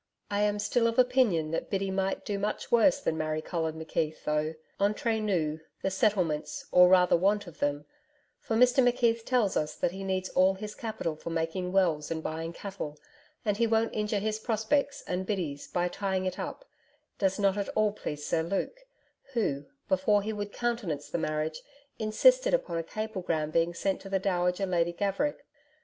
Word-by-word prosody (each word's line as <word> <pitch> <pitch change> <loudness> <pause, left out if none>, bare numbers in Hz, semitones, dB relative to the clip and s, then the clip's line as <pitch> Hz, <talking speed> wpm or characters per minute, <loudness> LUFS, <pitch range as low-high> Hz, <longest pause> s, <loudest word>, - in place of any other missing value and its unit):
I 205 0 +1
am 210 0 +2
still 230 +3 +2
of 230 - -1
opinion 245 -11 +3
that 165 - -2
Biddy 195 -1 -1
might 190 0 -1
do 200 -1 -2
much 210 +2 -3
worse 240 +4 +5
than 160 - -1
marry 155 0 -1
Colin 160 -1 -2
McKeith, 160 -1 -3
though, 150 +1 0 0.3
ENTRE 220 +2 +1
NOUS, 165 -7 0 0.2
the 190 - +1
settlements 185 -6 0
or 180 0 +8
rather 180 -1 +5
want 200 +4 +2
of 175 -3 -12
them 145 0 -1 0.5
for 225 - -2
Mr 250 +2 +5
McKeith 235 -2 +2
tells 240 -7 +2
us 150 0 -1
that - - 0
he 195 +2 -7
needs 190 -1 -1
all 190 +1 +4
his 210 +2 -6
capital 215 -9 -3
for 155 - -7
making 165 +2 -2
wells 170 -6 +2
and 160 -1 -3
buying 165 +1 -3
cattle, 170 -5 -6 0.5
and 205 -1 +1
he 230 0 +3
won't 225 0 +1
injure 210 0 0
his 215 +1 -1
prospects 235 +6 0
and 185 +1 -3
Biddy's 165 -9 -3
by 175 0 0
tying 190 0 -2
it 185 -1 -3
up - - -5 0.5
does 195 -1 +1
not 195 -1 +2
at 200 -1 -2
all 215 -1 +3
please 150 -7 -6
Sir 160 - +1
Luke, 195 - -2 0.5
who, 145 - -1 0.2
before 200 +2 +3
he 220 +1 -2
would 205 -1 -4
countenance 210 -13 -2
the - - -1
marriage, 155 0 -2 0.4
insisted - - +4
upon 170 - -2
a - - -2
cablegram 175 -6 -3
being 165 +1 +1
sent 195 +2 -1
to 195 - -9
the 195 - +2
Dowager 180 0 0
Lady 175 -2 +1
Gaverick. 200 +11 -1
190 Hz, 185 wpm, -29 LUFS, 165-215 Hz, 0.5 s, or